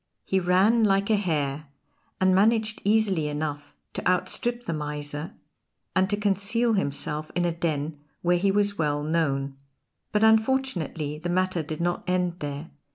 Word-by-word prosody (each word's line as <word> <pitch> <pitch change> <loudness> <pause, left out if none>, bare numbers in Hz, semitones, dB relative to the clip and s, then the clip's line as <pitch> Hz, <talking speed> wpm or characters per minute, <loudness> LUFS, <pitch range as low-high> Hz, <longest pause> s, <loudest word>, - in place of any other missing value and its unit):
He 190 - +1
ran 190 +6 +3
like 200 0 +2
a - - +5
hare 155 -6 -1 0.5
and 185 0 +4
managed 215 +2 +2
easily 200 -7 +2
enough 150 -1 -4 0.2
to - - -3
outstrip 240 +6 -1
the 170 - -2
miser, 150 0 -5 0.6
and 190 0 +3
to 205 - +1
conceal 210 +3 +1
himself 150 -4 -2
in 175 0 +1
a 170 - +1
den 155 -3 -2 0.2
where 175 0 +3
he 200 +2 +2
was 205 0 +1
well 145 -1 0
known. 140 -4 0 0.5
But 210 0 +2
unfortunately 220 - +1
the 175 +2 -4
matter 185 -1 +1
did 155 +1 -5
not 175 0 -1
end 180 -1 0
there. 145 +2 -5
175 Hz, 155 wpm, -26 LUFS, 150-205 Hz, 0.6 s, a